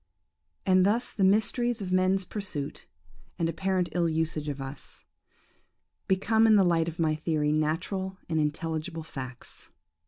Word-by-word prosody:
"And 185 -1 +5
thus 220 +5 +1
the 200 - 0
mysteries 220 +4 +2
of 190 -3 -5
man's 185 +1 +2
pursuit, 180 -9 -5 0.5
and 165 - +1
apparent 185 +1 0
ill 170 -1 +1
usage 155 -1 -1
of 140 -1 -4
us, 135 +1 -9 1.0
become 220 +4 +3
in 220 - +6
the 200 - +6
light 165 -2 +2
of 170 0 -5
my 160 -3 +2
theory 155 -1 0
natural 180 +5 -1
and 160 -2 0
intelligible 160 +2 -2
facts. 130 -5 -9
170 Hz, 145 wpm, -28 LUFS, 155-195 Hz, 1.0 s, in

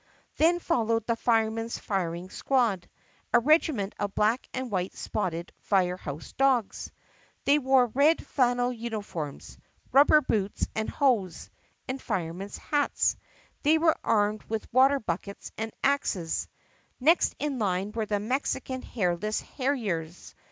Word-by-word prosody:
Then 335 +3 +4
followed 230 -10 0
the 230 - +1
Firemen's 225 0 0
Firing 180 -2 -3
Squad, 230 -9 0 0.4
a - - +6
regiment 255 -6 +2
of 205 -1 -3
black 220 +4 +1
and 260 -2 -4
white 185 -1 -2
spotted 170 -4 -3
fire 185 -3 +1
house 150 -3 -8
dogs. 265 -6 +1 0.5
They 290 +2 +5
wore 265 -2 +4
red 280 +7 +2
flan 245 -3 +2
nel 245 0 0
uniforms, 210 - -6 0.3
rubber 290 +2 +7
boots 210 -7 -1
and 220 0 -2
hose, 220 - 0 0.4
and 265 +1 -4
firemen's 180 +3 -4
hats. 290 -1 +1 0.5
They 310 +2 +4
were 320 0 +3
armed 210 0 +1
with 220 0 -5
water 270 +2 +5
buckets 200 0 -5
and 225 0 -4
axes. 205 -12 0 0.5
Next 320 +7 +3
in 285 -3 -2
line 195 -1 0
were 220 -1 -3
the 205 -1 0
Mexican 260 +3 -2
Hairless 205 -1 -1
Harriers. 205 - -3
225 Hz, 130 wpm, -27 LUFS, 195-265 Hz, 0.5 s, rubber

